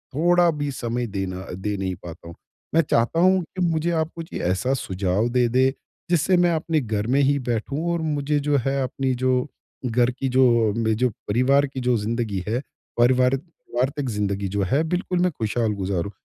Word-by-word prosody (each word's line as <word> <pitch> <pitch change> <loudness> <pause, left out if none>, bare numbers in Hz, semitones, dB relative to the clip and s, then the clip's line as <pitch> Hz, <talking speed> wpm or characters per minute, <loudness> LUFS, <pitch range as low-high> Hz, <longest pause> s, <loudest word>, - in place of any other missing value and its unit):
थोड़ा 175 +3 +4
भी 145 -1 -2
समय 120 -1 -3
देना 95 -2 -4
दे 100 +2 -3
नहीं 95 -1 -2
पाता 85 -1 -10
हूँ। 85 - -10 0.4
मैं 165 - +6
चाहता 120 +2 +1
हूँ 185 +1 +4
कि 185 +3 -7
मुझे 165 -1 +1
आप 160 - -3
कुछ 165 0 -8
ऐसा 95 +9 0
सुझाव 95 +4 0
दे 125 0 +2
दें 130 +2 +3 0.4
जिससे 180 +2 +3
मैं 175 -1 +4
अपने 160 0 0
घर 110 -2 -2
में - - +4
ही 140 +1 +3
बैठूँ 120 +5 -2
और 170 - -1
मुझे 150 -1 0
जो 145 - +4
है 135 0 0
अपनी 130 0 -1
जो 130 - +3 0.5
घर 120 +1 +2
की 130 +1 -3
जो 115 -5 +4
मे 110 -1 +1
जो 125 +2 +2 0.2
परिवार 130 +6 +3
की 135 -1 -6
जो 125 -1 +2
ज़िन्दगी 105 -3 -2
है 115 +4 0 0.4
पारिवारिक 125 +2 +3 0.3
वार्तिक 135 +2 0
ज़िन्दगी 100 -2 -1
जो 100 +1 -2
है 145 +4 +3
बिल्कुल 180 +1 -1
मैं 180 0 +2
खुशहाल 110 -2 -1
गुज़ारु। 95 -1 -2
125 Hz, 190 wpm, -23 LUFS, 105-145 Hz, 0.5 s, मैं